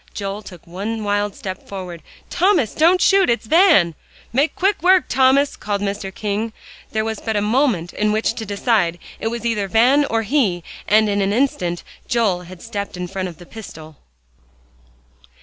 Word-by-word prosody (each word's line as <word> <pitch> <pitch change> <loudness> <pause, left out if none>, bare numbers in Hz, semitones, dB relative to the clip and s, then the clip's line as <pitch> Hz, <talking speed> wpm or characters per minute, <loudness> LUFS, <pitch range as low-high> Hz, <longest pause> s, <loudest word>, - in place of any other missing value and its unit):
Joel 200 0 -4
took 180 -5 -13
one 205 +6 -4
wild 205 0 -1
step 190 -1 -7
forward. 180 -4 -7 0.3
"Thomas 350 - +2
don't 340 +4 +4
shoot! 390 -1 +4
It's 235 -1 0
Van!" 315 - +5 0.4
"Make 280 +6 +1
quick 395 +2 +1
work, 370 +1 +5
Thomas!" 265 +2 +3
called 205 -1 -3
Mr. 200 -1 -3
King. 215 +3 -3 0.4
There 220 0 -1
was 220 -1 -3
but 220 -1 -3
a - - +2
moment 210 - +1
in 210 0 0
which 220 +1 0
to 225 - -4
decide. 200 -4 +1 0.2
It - - -2
was 235 +1 -4
either 210 -4 0
Van 250 +8 +4
or 225 -4 -1
he; 210 - +1 0.2
and 215 +1 +4
in 200 -1 0
an 195 +1 +1
instant 185 -9 0 0.2
Joel 220 -8 +1
had 185 -2 -11
stepped 200 -4 -5
in 180 - -3
front 185 +1 -4
of 165 - -12
the 175 - -13
pistol. 160 -8 -11
215 Hz, 175 wpm, -20 LUFS, 195-245 Hz, 0.4 s, Van